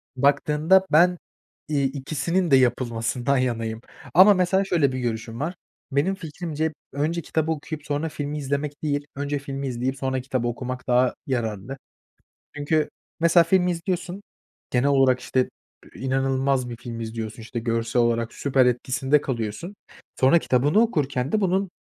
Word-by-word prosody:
baktığında 150 Hz, +7 st, +3 dB
ben, 175 Hz, +3 st, +5 dB, 0.5 s
iii, 145 Hz, -3 st, +1 dB
ikisinin 155 Hz, +5 st, -1 dB
de 135 Hz, -, +8 dB
yapılmasından 125 Hz, +1 st, +1 dB
yanayım 115 Hz, -3 st, -1 dB, 0.3 s
ama, 190 Hz, +5 st, +8 dB
mesela, 190 Hz, +1 st, +2 dB
şöyle 160 Hz, -8 st, +2 dB
bir 130 Hz, -, -3 dB
görüşüm 115 Hz, -1 st, -4 dB
var, 165 Hz, +6 st, -2 dB, 0.4 s
benim 145 Hz, +8 st, +1 dB
fikrimce 160 Hz, -2 st, -4 dB, 0.2 s
önce 160 Hz, +4 st, -1 dB
kitabı 160 Hz, +1 st, -1 dB
okuyup 155 Hz, -1 st, -5 dB
sonra 150 Hz, +2 st, -2 dB
filmi 150 Hz, 0 st, -4 dB
izlemek 145 Hz, +1 st, -3 dB
değil, 145 Hz, -1 st, -1 dB
önce 145 Hz, +1 st, -2 dB
filmi 140 Hz, 0 st, -5 dB
izleyip 130 Hz, +2 st, -2 dB
sonra 130 Hz, -1 st, -1 dB
kitabı 130 Hz, -2 st, -2 dB
okumak 130 Hz, +2 st, -5 dB
daha 125 Hz, 0 st, +3 dB
yararlı. 120 Hz, -1 st, -3 dB, 0.8 s
Çünkü, 150 Hz, +1 st, +1 dB, 0.3 s
mesela, 170 Hz, 0 st, +5 dB
filmi 180 Hz, +1 st, +3 dB
izliyorsun, 180 Hz, +3 st, -3 dB, 0.5 s
genel 125 Hz, +3 st, +2 dB
olarak, 135 Hz, -2 st, +4 dB
işte, 130 Hz, -1 st, 0 dB, 0.4 s
inanılmaz 135 Hz, -1 st, 0 dB
bir 120 Hz, -, -6 dB
film 115 Hz, -1 st, -7 dB
izliyorsun. 110 Hz, 0 st, -5 dB
İşte, 120 Hz, +1 st, -5 dB
görsel 115 Hz, +1 st, 0 dB
olarak 115 Hz, -1 st, 0 dB
süper, 135 Hz, -2 st, +2 dB
etkisinde 130 Hz, +3 st, +1 dB
kalıyorsun. 120 Hz, -, -4 dB, 0.5 s
Sonra 135 Hz, +6 st, +6 dB
kitabını 145 Hz, -, +2 dB
okurken 140 Hz, -, 0 dB
de 215 Hz, -, +2 dB
bunun 190 Hz, -1 st, +1 dB
140 Hz, 145 wpm, -24 LUFS, 125-160 Hz, 0.8 s, de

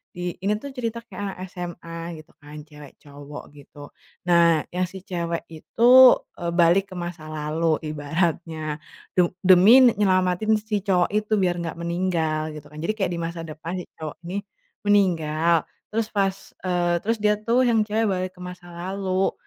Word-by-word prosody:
di 175 Hz, 0 st, -3 dB
ini 205 Hz, +1 st, +2 dB
tuh 280 Hz, -, -6 dB
cerita 235 Hz, -2 st, -4 dB
kayak 205 Hz, -3 st, -9 dB
anak -, -, -15 dB
SMA 175 Hz, -2 st, -7 dB, 0.3 s
gitu -, -, -26 dB
kan, 150 Hz, +1 st, -12 dB
cewek 150 Hz, -2 st, -13 dB
cowok 145 Hz, 0 st, -10 dB
gitu. 145 Hz, 0 st, -13 dB, 0.4 s
Nah 170 Hz, -2 st, +5 dB
yang 180 Hz, 0 st, 0 dB
si 190 Hz, -1 st, -10 dB
cewek 170 Hz, -3 st, -3 dB
itu 195 Hz, +8 st, -2 dB, 0.5 s
e 175 Hz, -, -8 dB
balik 185 Hz, +3 st, +3 dB
ke -, -, -9 dB
masa 175 Hz, -2 st, -6 dB
lalu 155 Hz, +1 st, 0 dB
ibaratnya. 155 Hz, 0 st, -2 dB, 0.4 s
Tu 175 Hz, -1 st, +4 dB, 0.2 s
demi 190 Hz, +8 st, +8 dB
ne 240 Hz, -, +6 dB
nyelamatin 185 Hz, +2 st, +2 dB
si 210 Hz, -2 st, -2 dB
cowok 180 Hz, -3 st, +2 dB
itu 215 Hz, +1 st, 0 dB
biar 175 Hz, -1 st, +1 dB
nggak 165 Hz, 0 st, -5 dB
meninggal 165 Hz, -3 st, -1 dB
gitu 150 Hz, -1 st, -10 dB
kan. 150 Hz, -, -12 dB
Jadi 215 Hz, +6 st, -1 dB
kayak 195 Hz, -4 st, 0 dB
di -, -, -3 dB
masa 165 Hz, 0 st, -4 dB
depan 160 Hz, +2 st, -7 dB
si -, -, -10 dB
cowok 155 Hz, -2 st, -6 dB
ini 185 Hz, +3 st, -4 dB, 0.5 s
meninggal. 170 Hz, -5 st, +2 dB, 0.3 s
Terus 225 Hz, 0 st, -1 dB
pas 195 Hz, -1 st, +1 dB, 0.3 s
eee 175 Hz, -1 st, +1 dB
terus 225 Hz, +2 st, 0 dB
dia 210 Hz, 0 st, +4 dB
tuh 235 Hz, +3 st, +2 dB
yang 225 Hz, -2 st, +3 dB
cewek 220 Hz, +1 st, 0 dB
balik 185 Hz, -1 st, -2 dB
ke -, -, -12 dB
masa 180 Hz, -1 st, -10 dB
lalu. 185 Hz, +2 st, -2 dB
175 Hz, 175 wpm, -24 LUFS, 160-195 Hz, 0.5 s, demi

